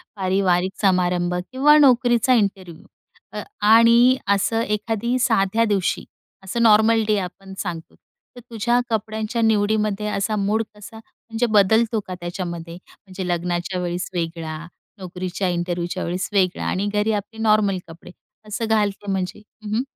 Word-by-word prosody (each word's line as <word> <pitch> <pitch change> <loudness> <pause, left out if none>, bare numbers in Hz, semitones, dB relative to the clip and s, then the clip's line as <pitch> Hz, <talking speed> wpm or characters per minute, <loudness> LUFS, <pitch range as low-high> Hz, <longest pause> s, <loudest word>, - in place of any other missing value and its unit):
पारिवारिक 190 -1 +1
समारंभ, 180 -2 +1 0.2
किंवा 290 +4 +5
नोकरीचा 245 -3 +4
इंटरव्ह्यू 195 -5 -1 0.8
आणि 230 +4 +6 0.2
असं 225 +3 0
एखाद्या 225 +3 -1
साध्या 225 -2 +2
दिवशी, 200 -4 0 0.4
असं 195 +5 -3
नॉर्मल 220 0 +5
डे 215 -1 +2
आपण 190 +1 -8
सांगतो, 170 -4 -6 0.4
तर - - -10
तुझ्या 235 +1 +1
कपड्यांच्या 220 +1 -2
निवडीमध्ये 210 -1 +1
असा 210 +1 -1
मूड 210 +2 0
कसा 210 +2 -12
म्हणजे 225 +1 -5
बदलतो 220 +1 +3
का 185 - -5
त्याच्यामध्ये? 175 -1 -5
म्हणजे 185 +1 -10
लग्नाच्या 175 +1 -2
वेळेस 175 0 -3
वेगळा, 165 -2 -4 0.4
नोकरीच्या 185 0 -4
इंटरव्ह्यूच्या 175 +1 -3
वेळेस 180 +2 -3
वेगळा, 190 -3 +1
आणि 195 +2 -1
घरी 210 +1 +1
आपले 210 +2 -5
नॉर्मल 215 -3 +2
कपडे, 165 +1 -13 0.4
असं 215 +2 -3
घालते 205 -2 0
म्हणजे? 190 +1 -3 0.2
हं, 210 0 -3
हं. 235 - +1
205 Hz, 130 wpm, -21 LUFS, 180-225 Hz, 0.8 s, आणि